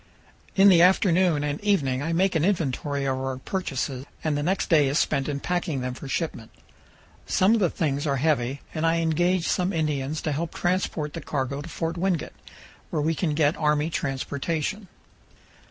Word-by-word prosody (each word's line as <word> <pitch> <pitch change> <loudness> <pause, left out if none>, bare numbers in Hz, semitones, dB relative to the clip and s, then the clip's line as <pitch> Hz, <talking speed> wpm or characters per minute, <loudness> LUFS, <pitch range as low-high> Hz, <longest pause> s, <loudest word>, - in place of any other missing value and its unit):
In 200 +1 +7
the 175 -3 +6
afternoon 180 -3 +4
and 145 0 -2
evening 140 -11 +1
I 160 +3 -2
make 185 +3 +2
an 160 -3 +1
inventory 145 -6 0
of 130 -1 0
our 130 0 -3
purchases, 135 -5 -3 0.2
and 155 -2 0
the 145 - -1
next 185 +6 0
day 150 -4 +4
is 140 +2 0
spent 140 -2 +1
in 140 -1 -2
packing 175 -4 -2
them 125 0 -3
for 135 - -9
shipment. 135 -6 -3 0.8
Some 190 +4 +3
of 230 - +3
the 180 -4 +3
things 145 -2 -1
are 140 - +1
heavy, 140 -2 0
and 160 - -3
I 165 0 +3
engage 170 +2 +1
some 180 +1 +1
Indians 150 -3 -1
to 155 - -1
help 160 +3 -3
transport 175 -4 -1
the - - -5
cargo 140 0 -3
to 165 - -9
Fort 165 +1 -3
Wingate, 180 -2 -1 0.6
where 155 - -2
we 160 +2 +1
can 155 -2 -1
get 150 0 +3
army 150 +1 +1
transportation. 150 +8 -2
155 Hz, 185 wpm, -25 LUFS, 140-175 Hz, 0.8 s, In